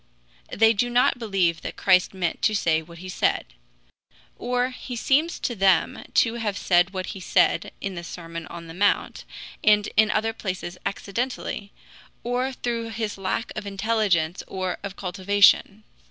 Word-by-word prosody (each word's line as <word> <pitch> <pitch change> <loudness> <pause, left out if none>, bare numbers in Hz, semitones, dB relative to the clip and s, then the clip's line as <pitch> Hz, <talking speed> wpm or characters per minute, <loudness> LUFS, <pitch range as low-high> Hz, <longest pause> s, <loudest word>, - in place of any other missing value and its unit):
They 225 +1 +4
do 245 +3 0
not 245 0 +3
believe 190 -7 0
that - - -6
Christ 185 -2 +3
meant 180 -3 -3
to 215 - +2
say 160 -5 +2
what 170 +1 -13
he 185 +2 -9
said; 185 - 0 0.9
or 250 +1 -1
he 250 0 -7
seems 295 +8 +1
to 240 - -1
them 190 -4 +2
to 230 - +4
have 205 -3 -2
said 180 -1 +3
what 185 -1 -4
he 195 - -8
said 185 - +2
in 195 - -3
the 170 -1 -6
Sermon 165 -1 -7
on 170 -1 -9
the 165 - -10
Mount 205 +4 0 0.4
and 210 -1 +4
in 215 0 +5
other 220 +1 0
places 185 -4 -5
accidentally, 205 0 -4 0.5
or 250 +2 -1
through 235 -3 -3
his 220 -2 -4
lack 195 +5 -2
of 215 -1 -5
intelligence 195 -5 0
or 185 -1 -3
of 195 -1 -6
cultivation. 200 +2 +3
200 Hz, 160 wpm, -24 LUFS, 185-225 Hz, 0.9 s, in